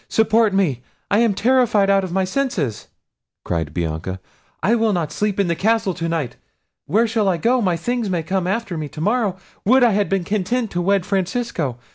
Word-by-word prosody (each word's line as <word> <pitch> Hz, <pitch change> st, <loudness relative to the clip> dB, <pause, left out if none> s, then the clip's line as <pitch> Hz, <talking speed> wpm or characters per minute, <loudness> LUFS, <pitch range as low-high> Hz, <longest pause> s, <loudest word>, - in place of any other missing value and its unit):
—support 220 Hz, 0 st, +3 dB
me! 175 Hz, -11 st, +1 dB, 0.3 s
I 205 Hz, -, +4 dB
am 230 Hz, -4 st, +2 dB
terrified 230 Hz, -3 st, +3 dB
out 195 Hz, 0 st, +3 dB
of 185 Hz, -, -5 dB
my 190 Hz, +1 st, +1 dB
senses," 185 Hz, -, -2 dB, 0.6 s
cried 80 Hz, -3 st, -2 dB
Bianca. 85 Hz, +3 st, -3 dB, 0.4 s
"I 215 Hz, -, +3 dB
will 225 Hz, -2 st, +2 dB
not 170 Hz, -5 st, -1 dB
sleep 210 Hz, -1 st, -1 dB
in 200 Hz, -, +3 dB
the 170 Hz, -, 0 dB
castle 220 Hz, 0 st, +1 dB
to 165 Hz, -1 st, -3 dB
night. 160 Hz, -7 st, -2 dB, 0.5 s
Where 225 Hz, +4 st, +3 dB
shall 220 Hz, -3 st, +1 dB
I 180 Hz, -, +1 dB
go? 245 Hz, +8 st, +2 dB
my 180 Hz, -5 st, +1 dB
things 240 Hz, +4 st, -2 dB
may 175 Hz, -3 st, -1 dB
come 185 Hz, +2 st, -1 dB
after 195 Hz, -4 st, -2 dB
me 150 Hz, -2 st, -5 dB
to 150 Hz, -, -10 dB
morrow—would 215 Hz, +4 st, +1 dB
I 240 Hz, -, +5 dB
had 205 Hz, 0 st, +1 dB
been 195 Hz, -2 st, 0 dB
content 215 Hz, +5 st, -1 dB
to 175 Hz, -, -1 dB
wed 195 Hz, 0 st, +1 dB
Francesco! 190 Hz, -, -2 dB
195 Hz, 195 wpm, -20 LUFS, 170-225 Hz, 0.6 s, I